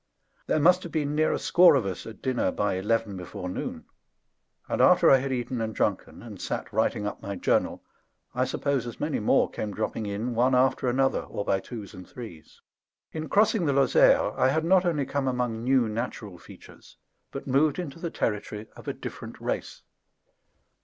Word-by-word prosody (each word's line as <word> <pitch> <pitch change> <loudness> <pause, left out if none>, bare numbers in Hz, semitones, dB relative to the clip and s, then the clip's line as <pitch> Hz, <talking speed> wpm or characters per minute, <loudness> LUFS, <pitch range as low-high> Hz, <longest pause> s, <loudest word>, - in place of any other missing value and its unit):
There - - +2
must 180 +4 +5
have 170 - -8
been 150 -2 -1
near 155 +1 +2
a - - 0
score 175 -3 +5
of 130 -7 +1
us 95 -3 -5
at 110 - -11
dinner 130 -2 0
by 105 -1 -1
eleven 105 +2 -1
before 90 0 -7
noon; 90 - -5 0.8
and - - -1
after - - +6
I 135 - +8
had 135 +1 -3
eaten 125 -1 -2
and 110 -1 -3
drunken, - - -2
and - - -10
sat - - -4
writing 105 - 0
up 105 - -5
my 100 0 -5
journal, 90 - 0 0.5
I 125 +1 +1
suppose 135 -1 -1
as 120 - -8
many - - -1
more - - +3
came 105 -2 -5
dropping 110 - -3
in 105 +5 -3
one 125 +3 +3
after 130 0 +2
another, 135 +2 +1
or 100 - -6
by 95 - +1
twos 110 -1 -9
and 90 -2 -11
threes. 90 - -11 0.5
In 155 0 -5
crossing 210 -4 +3
the 140 - +2
Lozère 135 -2 +4
I 130 - +4
had 160 +4 0
not 185 +1 +4
only 150 -5 0
come 140 -1 -2
among 125 -3 -1
new 130 -2 +3
natural 105 -4 -5
features, - - -15 0.3
but - - -7
moved 140 +3 +2
into 165 -4 -6
the 170 - -3
territory 105 -4 -3
of - - -13
a - - -1
different - - -8
race. - - -4
125 Hz, 190 wpm, -26 LUFS, 105-140 Hz, 0.8 s, I